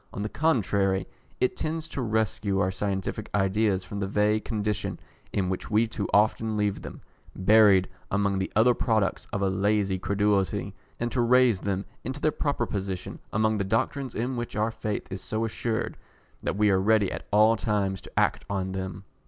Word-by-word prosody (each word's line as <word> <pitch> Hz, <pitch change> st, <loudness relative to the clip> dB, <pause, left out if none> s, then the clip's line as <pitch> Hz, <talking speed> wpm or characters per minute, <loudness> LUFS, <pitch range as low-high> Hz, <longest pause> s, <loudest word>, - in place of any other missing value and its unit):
On 100 Hz, -, -4 dB
the 105 Hz, -, -2 dB
contrary, 100 Hz, -, +1 dB, 0.3 s
it 125 Hz, -, +1 dB
tends 160 Hz, 0 st, -3 dB
to 140 Hz, -, -4 dB
rescue 110 Hz, -3 st, 0 dB
our 95 Hz, -1 st, +2 dB
scientific 100 Hz, +2 st, -3 dB
ideas 100 Hz, -1 st, +2 dB
from 100 Hz, +2 st, -6 dB
that 100 Hz, -, -1 dB
vague 105 Hz, +2 st, +2 dB
condition 105 Hz, -2 st, -2 dB, 0.3 s
in 95 Hz, -2 st, 0 dB
which 95 Hz, 0 st, -3 dB
we 110 Hz, +2 st, +3 dB
too 110 Hz, -3 st, -4 dB
often 110 Hz, +1 st, +2 dB
leave 105 Hz, -1 st, 0 dB
them, -, -, -9 dB, 0.3 s
buried 100 Hz, -1 st, +5 dB, 0.2 s
among 100 Hz, -1 st, +1 dB
the 95 Hz, -, -2 dB
other 115 Hz, +3 st, +5 dB
products 110 Hz, -5 st, 0 dB
of 100 Hz, -, -1 dB
a -, -, +3 dB
lazy 100 Hz, 0 st, +1 dB
credulity, 100 Hz, 0 st, 0 dB, 0.3 s
and 120 Hz, 0 st, -1 dB
to 125 Hz, -, +1 dB
raise 120 Hz, -4 st, +4 dB
them 100 Hz, 0 st, -2 dB, 0.2 s
into 130 Hz, +4 st, -4 dB
their 155 Hz, -, +2 dB
proper 140 Hz, -6 st, -1 dB
position 95 Hz, -3 st, -4 dB
among 110 Hz, 0 st, +1 dB
the -, -, +1 dB
doctrines 115 Hz, +6 st, -1 dB
in 125 Hz, +3 st, -1 dB
which 120 Hz, -3 st, -4 dB
our 110 Hz, +2 st, +1 dB
faith 105 Hz, -2 st, -3 dB
is 95 Hz, -1 st, -5 dB
so 110 Hz, +1 st, -2 dB
assured, 115 Hz, 0 st, -2 dB, 0.4 s
that -, -, -2 dB
we 105 Hz, -1 st, +4 dB
are 95 Hz, -1 st, +3 dB
ready 105 Hz, -1 st, +3 dB
at -, -, -6 dB
all 110 Hz, +2 st, +5 dB
times 100 Hz, -3 st, -1 dB
to -, -, -3 dB
act -, -, +1 dB
on 95 Hz, -2 st, -2 dB
them. 95 Hz, 0 st, -5 dB
105 Hz, 185 wpm, -27 LUFS, 95-110 Hz, 0.4 s, buried